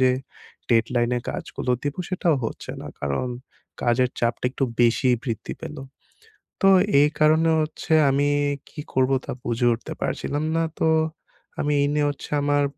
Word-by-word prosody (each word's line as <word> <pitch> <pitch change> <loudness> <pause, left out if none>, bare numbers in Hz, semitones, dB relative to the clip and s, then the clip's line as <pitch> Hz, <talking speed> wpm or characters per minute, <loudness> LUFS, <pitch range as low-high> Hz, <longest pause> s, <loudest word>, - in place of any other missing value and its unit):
যে 130 0 +5 0.6
ডেডলাইন 120 +1 +2 0.2
কাজগুলো 125 - -4
দিব 145 0 -2
সেটাও 175 -4 +1
হচ্ছে - - -5
না। - - -8
কারণ 70 - -1 0.6
কাজের 125 +1 +3
চাপটা 120 +1 -1
একটু 135 +1 -1 0.2
বেশিই 120 +1 +4
বৃদ্ধি 115 -4 -4
পেলো। 150 -2 -7 0.8
তো 195 - +6 0.3
এই 150 - +5
কারণে 160 +2 +4
হচ্ছে 155 +1 -2 0.2
আমি 140 +1 +2 0.4
কী 150 - -11
করবো 130 +1 +3
তা - - -4
বুঝে 120 0 0
উঠতে 115 - -6
পারছিলাম 145 +2 -2
না। 165 - +2 0.2
তো 160 - +2 0.7
আমি 150 0 +1
এই 140 - +3
নিয়ে 150 -1 +2
হচ্ছে 145 - -7
আমার 145 0 +2
135 Hz, 150 wpm, -24 LUFS, 120-150 Hz, 0.8 s, তো